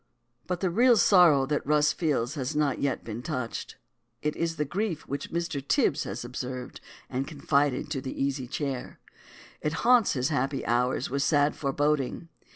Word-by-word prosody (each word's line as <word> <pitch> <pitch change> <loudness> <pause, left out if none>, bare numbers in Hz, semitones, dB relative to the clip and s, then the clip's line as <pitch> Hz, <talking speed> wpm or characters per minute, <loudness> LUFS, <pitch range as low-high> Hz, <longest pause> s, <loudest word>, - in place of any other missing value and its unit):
But 180 -1 -2
the 185 -2 +1
real 240 +5 +5
sorrow 175 -10 +6
that 145 +1 -1
Rus 150 +1 +3
feels 145 -6 0
has 145 0 -3
not 150 -3 +1
yet 140 -2 -1
been 115 +1 -6
touched. 125 -2 -4 0.5
It 150 0 0
is 165 -1 -1
the 150 - -1
grief 180 +1 -3
which 140 - -5
Mr. 170 -4 -2
Tibs 155 - +1
has - - -5
observed 125 0 -6 0.3
and 135 +1 -3
confided 145 -2 0
to 135 -4 -2
the 130 - -6
Easy 135 -2 -1
Chair. 135 -1 -4 0.6
It 150 - -1
haunts 240 -3 +5
his 130 -1 0
happy 135 -2 -1
hours 125 +2 0
with 140 +1 0
sad 145 +1 +3
foreboding. 145 +2 -1
145 Hz, 165 wpm, -27 LUFS, 130-160 Hz, 0.6 s, sorrow